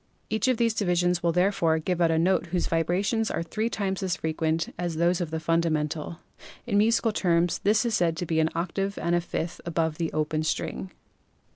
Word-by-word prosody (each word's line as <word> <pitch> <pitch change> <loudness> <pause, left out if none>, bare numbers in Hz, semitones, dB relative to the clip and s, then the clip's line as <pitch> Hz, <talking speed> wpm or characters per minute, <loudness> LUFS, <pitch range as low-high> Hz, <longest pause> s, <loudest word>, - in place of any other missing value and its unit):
Each 220 +3 +1
of 255 -2 +2
these 230 -1 +2
divisions 180 -4 +1
will 170 - +2
therefore 180 -2 +2
give 175 +2 -2
out 170 - +4
a 165 - +2
note 180 +2 +2
whose 175 +1 -1
vibrations 190 +7 0
are - - -2
three 215 +6 -2
times 195 -4 -2
as 185 -2 0
frequent 160 0 -1
as 175 -2 -3
those 170 +2 +2
of 170 - -2
the 160 0 -3
fundamental; 160 -1 -1 0.5
in 205 -4 +2
musical 225 +1 +3
terms 175 -4 +1
this 215 +2 +2
note - - +2
is - - -3
said 170 -5 +1
to 175 - -2
be 160 -1 0
an 160 0 +3
octave 195 +4 -2
and 170 - -1
a 175 - +3
fifth 170 0 -4
above 165 -2 -1
the 165 -1 -1
open 155 0 -1
string. 160 +4 -2
175 Hz, 210 wpm, -26 LUFS, 165-195 Hz, 0.5 s, out